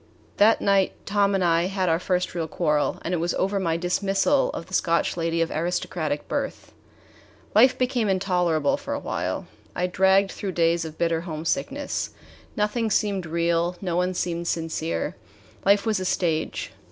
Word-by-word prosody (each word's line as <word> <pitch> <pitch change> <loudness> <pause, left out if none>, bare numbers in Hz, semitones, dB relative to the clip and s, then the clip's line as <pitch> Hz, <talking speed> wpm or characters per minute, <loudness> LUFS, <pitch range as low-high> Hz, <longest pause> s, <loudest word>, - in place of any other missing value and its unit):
That 215 +2 +5
night 195 -1 +3
Tom 200 0 +2
and 190 - +1
I 170 0 +3
had 190 -1 -1
our 165 0 +2
first 180 0 -1
real 165 -2 -2
quarrel, 150 -2 0
and 175 - -2
it - - +2
was 170 +1 -1
over 195 +1 0
my 165 -3 0
dismissal 195 +9 +1
of - - -5
the 185 - -15
Scotch 170 -2 +1
lady 165 0 0
of 165 - -5
aristocratic 160 -2 -2
birth. 280 -1 -4 0.8
Life 250 +5 +6
became 245 -4 0
intolerable 180 -5 +1
for - - -4
a - - -3
while. - - -3 0.3
I 180 - 0
dragged 190 +2 +3
through 195 -2 -5
days 170 0 +2
of 160 -1 -8
bitter 165 -1 +1
homesickness. 270 - -2 0.5
Nothing 220 +2 0
seemed 200 -4 0
real. 170 +1 0
No 180 -3 -2
one 180 +1 0
seemed 170 -1 -2
sincere. 160 - -2 0.5
Life 200 +1 +4
was 215 -3 +1
a 185 - -3
stage. 165 -4 -1
180 Hz, 165 wpm, -25 LUFS, 165-200 Hz, 0.8 s, Life